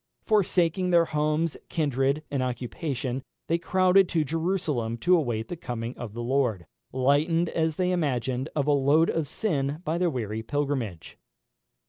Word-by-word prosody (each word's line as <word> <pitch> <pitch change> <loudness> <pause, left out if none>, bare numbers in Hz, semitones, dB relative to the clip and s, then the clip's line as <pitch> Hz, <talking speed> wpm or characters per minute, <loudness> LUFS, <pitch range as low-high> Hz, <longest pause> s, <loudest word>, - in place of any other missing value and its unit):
Forsaking 185 -4 +2
their 170 -1 +5
homes, 155 +1 0
kindred, 140 -1 0
and 140 -2 0
occupation, 130 +1 -3 0.2
they 165 +1 0
crowded 185 +1 +4
to 160 -2 +1
Jerusalem 155 -7 -1
to 180 +9 +4
await 120 -9 -1
the 175 - -5
coming 120 -6 -5
of 115 -4 -7
the 120 +1 -5
Lord, 120 -8 0 0.3
lightened, 150 +6 +2
as 160 -1 0
they 180 +1 +1
imagined, 130 -5 -1
of 145 -3 +1
a 150 - +2
load 145 +4 +4
of 160 -3 -1
sin 145 -8 -1
by 165 +1 -1
their 180 -1 +2
weary 110 -6 -3
pilgrimage. 130 - -3
145 Hz, 150 wpm, -27 LUFS, 125-165 Hz, 0.3 s, their